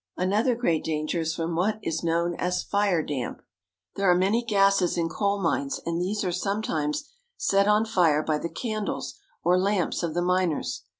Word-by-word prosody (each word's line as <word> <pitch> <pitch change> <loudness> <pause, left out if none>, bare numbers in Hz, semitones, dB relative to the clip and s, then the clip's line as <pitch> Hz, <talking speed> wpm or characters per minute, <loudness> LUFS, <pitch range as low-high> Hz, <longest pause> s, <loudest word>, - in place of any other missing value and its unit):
Another 210 +7 +2
great 170 -10 0
danger 155 +2 -1
is 160 0 -1
from 165 0 -2
what 205 +5 +1
is 160 +1 -2
known 170 +1 +1
as 180 +1 -1
fire 200 -5 +1
damp. 135 -5 -4 0.5
There 195 -1 +2
are 180 - +6
many 200 +6 +2
gases 195 -5 +3
in 165 -1 0
coal 200 +4 0
mines, 265 +10 -1
and 170 +1 -1
these 205 +4 -1
are 180 - 0
sometimes 180 - -2 0.3
set 200 0 +2
on 210 +1 +4
fire 165 -8 +3
by 155 -1 0
the 170 - -4
candles 215 -2 -4 0.2
or 180 +2 +4
lamps 195 -1 0
of 170 -2 -3
the 175 - +1
miners. 180 -3 0
180 Hz, 180 wpm, -26 LUFS, 165-205 Hz, 0.5 s, are